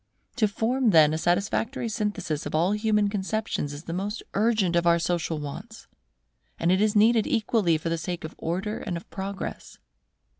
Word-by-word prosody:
To 220 -4 +3
form 235 +4 +1
then 155 -5 +6
a - - 0
satisfactory 210 +8 0
synthesis 205 -8 -2
of - - -4
all 170 +5 +2
human 210 0 +2
conceptions 205 -6 -2
is 145 +2 -8
the 165 - -5
most 205 +5 -3
urgent 205 -4 +2
of 170 0 +2
our 170 0 +5
social 170 -1 -1
wants: 200 +10 -8 0.7
and 170 - +2
it 190 +2 +3
is 215 0 +2
needed 220 +1 +4
equally 220 - +2
for 165 +2 -4
the 165 0 -1
sake 175 +1 -4
of 160 - -6
Order 190 +6 -2
and 180 -5 -4
of 170 - -11
Progress. 195 +1 -6
195 Hz, 180 wpm, -26 LUFS, 170-215 Hz, 0.7 s, then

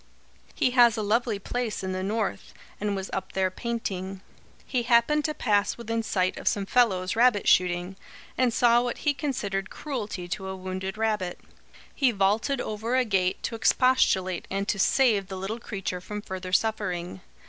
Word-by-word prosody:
He 255 - +2
has 240 -2 +5
a 215 - -1
lovely 225 +1 +1
place 230 +1 -3
in 190 - -2
the 185 0 -2
North, 210 +2 -3 0.2
and 205 -1 -1
was 190 0 -5
up 190 0 -4
there 190 -1 +1
painting. 195 -4 -4 0.4
He 255 -3 0
happened 245 +6 +3
to 305 - -1
pass 205 -3 +1
within 230 -1 -2
sight 185 -4 0
of - - -7
some 200 -1 +1
fellows 195 -5 +2
rabbit 230 -3 +3
shooting, 180 +1 +2 0.4
and 255 -2 +2
saw 240 0 +4
what 245 -1 -3
he 295 - +4
considered 210 -10 -3
cruelty 215 -11 -5
to 190 +1 -4
a 190 - -4
wounded 190 +1 -5
rabbit. 210 -5 -1 0.5
He 270 -3 +3
vaulted 220 +6 +1
over 220 +3 -2
a 255 -1 +3
gate 190 -4 0
to - - -3
expostulate 225 -6 +2
and 195 +1 -2
to 200 - 0
save 215 -4 +3
the 190 - -6
little 200 +5 -4
creature 195 -5 -4
from 210 +2 -6
further 185 -2 -6
suffering. 185 - -1
210 Hz, 170 wpm, -26 LUFS, 190-235 Hz, 0.5 s, has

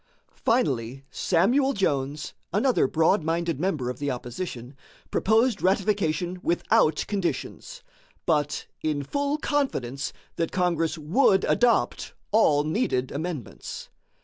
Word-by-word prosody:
Finally, 135 - 0
Samuel 245 +11 +2
Jones, 145 - -1 0.2
another 220 - +3
broad 165 +7 +3
minded 165 -2 -1
member 155 -8 -1
of 125 0 -4
the 145 0 -1
opposition, 125 0 -5 0.4
proposed 220 +1 +2
ratification 185 -3 +1
without 160 -3 +2
conditions, 210 - -3 0.4
but 150 -3 0 0.2
"in 150 -2 -1
full 285 - -1
confidence" 200 - -1 0.3
that 165 - -1
Congress 170 -3 0
would 190 - +3
adopt 240 -1 +1 0.2
all 155 -9 +4
needed 150 - 0
amendments. 155 - -6
170 Hz, 105 wpm, -26 LUFS, 145-205 Hz, 0.4 s, all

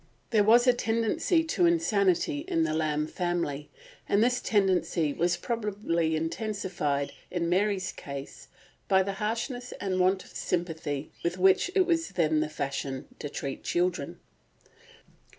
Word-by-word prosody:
There 215 -3 +4
was 235 +4 +6
a 250 - +6
tendency 230 - +1
to 335 +2 +2
insanity 290 - +2
in 335 -3 +1
the - - 0
Lamb 155 -1 0
family, 170 -4 -2 0.4
and 205 +2 +4
this 245 +1 +2
tendency 180 -7 +1
was 175 +2 +1
probably 195 -7 -1
intensified 165 -5 -2 0.2
in 175 -2 -1
Mary's 190 +1 +1
case 140 -1 -8 0.4
by 190 -1 +4
the 195 +1 -3
harshness 240 +3 -3
and 185 -1 -2
want 185 +1 +2
of - - -16
sympathy 160 -5 -3
with 175 +1 -1
which 190 - +4
it 380 -2 +5
was 330 -2 +1
then 155 -3 +2
the 155 0 -1
fashion 135 -2 -4
to 145 - -5
treat 140 -1 -5
children. 180 0 -1
185 Hz, 140 wpm, -28 LUFS, 160-225 Hz, 0.4 s, was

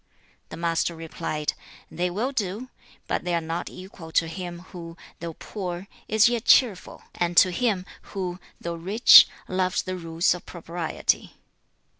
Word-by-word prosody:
The - - -8
Master 170 0 0
replied, 160 -2 -3 0.4
'They 180 +1 -1
will 220 +9 -2
do; 225 0 -3 0.3
but - - -2
they 175 -1 0
are - - +2
not 165 +2 -4
equal 185 -3 -11
to 165 - +3
him, 175 0 -6
who, 170 -2 -9 0.2
though 165 -1 -6
poor, 185 -2 -6 0.2
is 220 +1 +5
yet 235 -1 -1
cheerful, 220 -8 +3
and 175 0 -2
to 185 - +7
him, 195 -1 0 0.3
who, 180 -1 -3 0.2
though 170 - -4
rich, 190 +8 +8 0.2
loves 185 0 0
the 185 -1 -4
rules 165 -1 +1
of 180 - -8
propriety.' 170 -1 -2
175 Hz, 150 wpm, -25 LUFS, 170-190 Hz, 0.4 s, rich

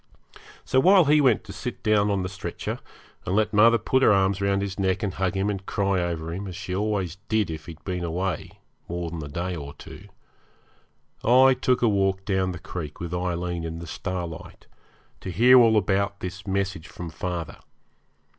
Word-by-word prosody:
So 130 - +3
while 185 +4 +6
he 150 +1 +5
went 130 -6 +3
to 100 -3 -10
sit 125 - -6
down 105 -2 +3
on 100 -2 0
the - - -2
stretcher, 95 +1 -5 0.4
and 95 - -2
let 110 0 +1
mother 115 +3 +6
put 130 +4 +1
her 120 - +6
arms 95 -1 +2
round 100 0 +1
his 100 0 -5
neck 95 +2 0
and 100 -3 -1
hug 95 0 -1
him 95 +1 0
and 100 -2 -2
cry 100 -3 0
over 85 -2 -3
him, 100 +3 -5
as 90 - -7
she 90 - -5
always 100 -4 -1
did 110 -5 +1
if 80 -1 -7
he'd 80 -2 -10
been 90 -2 -3
away 85 0 -2 0.4
more 85 -1 -3
than 80 -2 -5
a - - -6
day 90 +5 -3
or 70 -3 -8
two, - - -12 1.2
I 130 +3 +6
took 125 -1 +1
a - - +5
walk 95 -2 +1
down 95 -2 0
the 90 - -6
creek 80 -3 -7
with 85 0 -5
Aileen 90 -1 -2
in 80 0 -5
the 85 - -7
starlight, 85 -1 -6 0.5
to - - -7
hear 120 +8 +6
all 115 -2 +5
about 100 0 0
this 95 +2 -7
message 95 -3 -2
from 85 -2 -8
father. 85 -1 -4
95 Hz, 195 wpm, -25 LUFS, 85-105 Hz, 1.2 s, while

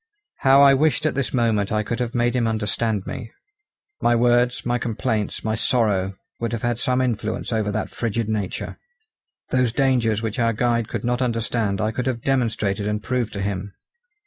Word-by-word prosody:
How 135 +1 +6
I 140 -1 +8
wished 155 +3 +2
at 155 - +2
this 135 -1 -1
moment 115 -5 +1
I 105 0 +1
could 115 +3 -3
have 120 +1 -2
made 120 +1 +1
him 120 -2 +2
understand 110 -1 -1
me. 120 -4 -6 0.7
My 120 - +3
words, 120 +1 +2
my 120 0 +1
complaints, 110 -2 -2
my 110 - 0
sorrow 105 -4 +1 0.2
would 115 0 -2
have 115 - -3
had 120 -1 0
some 130 0 +1
influence 115 -2 -2
over 110 -2 0
that 110 +1 -3
frigid 115 -1 -2
nature. 105 -4 -3 0.7
Those 125 -2 +2
dangers 120 -4 +1
which 110 0 -3
our 115 -1 +2
guide 115 0 +1
could - - -4
not 125 +1 0
understand 115 -4 0
I 110 0 0
could 125 +3 -3
have 120 -3 -2
demonstrated 110 -6 0
and 105 0 -2
proved 125 -3 -1
to 100 - -3
him. 100 0 -4
115 Hz, 185 wpm, -23 LUFS, 110-125 Hz, 0.7 s, I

